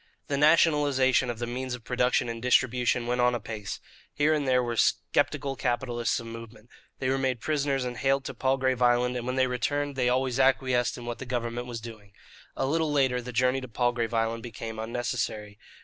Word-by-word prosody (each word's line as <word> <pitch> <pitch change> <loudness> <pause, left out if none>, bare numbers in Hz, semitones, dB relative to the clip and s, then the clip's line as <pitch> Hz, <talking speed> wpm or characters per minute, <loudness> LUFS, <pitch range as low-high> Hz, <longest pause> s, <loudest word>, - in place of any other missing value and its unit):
The 140 - 0
nationalization 145 -4 +4
of 120 - -3
the 120 - -3
means 125 +1 -4
of 120 - -13
production 125 0 +1
and 115 -1 -5
distribution 125 -1 +2
went 125 +1 0
on 125 0 +3
apace. 110 -3 -5 0.3
Here 150 +1 +2
and 145 -3 -1
there 125 -1 +3
were 120 -1 -2
sceptical 140 +4 +1
capitalists 120 -1 -1
of 115 - -8
moment. 115 0 -10 0.3
They 130 - -2
were 135 0 +1
made 130 -2 0
prisoners 140 -2 0
and 125 -1 -4
haled 135 0 +1
to - - -5
Palgrave 130 -1 0
Island, 125 0 +3
and 120 0 -4
when 130 - -1
they 130 0 +3
returned 145 +3 -1
they 125 -2 +1
always 130 0 0
acquiesced 130 -2 +2
in 120 - -8
what 120 0 -5
the 135 - -7
government 120 0 -3
was 120 -2 -5
doing. 110 -3 -11 0.4
A 135 - -1
little 160 +2 0
later 130 -4 +2
the 125 +1 -7
journey 125 +2 +1
to 130 - -7
Palgrave 120 0 0
Island 115 0 0
became 115 -1 -7
unnecessary. 110 -3 -3
125 Hz, 195 wpm, -27 LUFS, 120-135 Hz, 0.4 s, nationalization